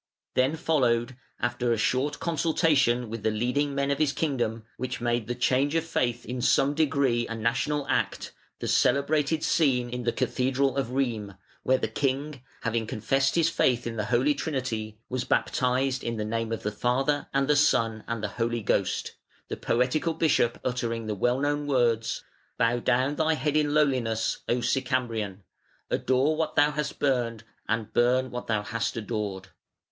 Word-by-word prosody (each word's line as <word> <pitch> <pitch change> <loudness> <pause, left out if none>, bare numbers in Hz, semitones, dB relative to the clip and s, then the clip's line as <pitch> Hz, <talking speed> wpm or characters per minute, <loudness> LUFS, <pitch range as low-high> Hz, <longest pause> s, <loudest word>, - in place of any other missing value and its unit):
Then 130 +4 +2
followed, 130 -6 +1 0.2
after 120 0 0
a 115 - +2
short 135 +6 0
consultation 155 -7 +2
with 115 0 -6
the 110 - +1
leading 125 +6 0
men 140 0 0
of 140 - -1
his 150 -2 +2
kingdom, 120 -7 -1
which 130 -1 -4
made 120 -2 -1
the 120 - -2
change 135 +4 +1
of 165 - +2
faith 120 -7 -1
in 125 0 -4
some 135 +3 +3
degree 140 -6 +1
a 115 - -4
national 115 +6 0
act, - - -1 0.3
the - - -5
celebrated 150 +2 +2
scene 125 -6 +2
in 125 0 -3
the 120 -1 0
cathedral 135 +3 0
of 135 -3 -1
Rheims, 120 -6 -2 0.3
where 130 - +3
the - - -1
king, 135 +4 -2 0.2
having 115 -2 -1
confessed 135 +6 0
his 165 -2 +4
faith 125 -5 +2
in 115 -1 -4
the 105 -2 -2
Holy 125 +6 +2
Trinity, 115 -8 -3
was 125 -1 -2
baptised 130 +2 0
in 115 -1 -3
the 105 - -2
name 115 +1 -2
of 115 - -3
the 105 - -1
Father 135 +7 0
and 140 0 +1
the 150 - +4
Son 115 -6 +2
and 115 -2 -3
the - - +1
Holy 115 -1 0
Ghost, - - 0 0.4
the - - -2
poetical 130 +7 0
bishop 145 -7 +2
uttering 120 -2 -2
the 110 - -2
well 120 +6 +1
known 145 +1 0
words: 120 -5 +1 0.3
"Bow 115 +1 +2
down 130 +4 +1
thy 160 0 +2
head 150 +1 -1
in 150 -1 +2
lowliness, 125 -7 +1
O 120 +1 +1
Sicambrian; 120 -7 -1 0.5
adore 135 +4 +2
what 160 0 -2
thou 145 +1 +4
hast 150 0 -3
burned 120 -5 0 0.2
and 115 -1 -2
burn 125 +2 +2
what 125 0 -6
thou 105 -2 0
hast 115 +2 -2
adored". 105 -4 -4
125 Hz, 175 wpm, -27 LUFS, 115-140 Hz, 0.5 s, his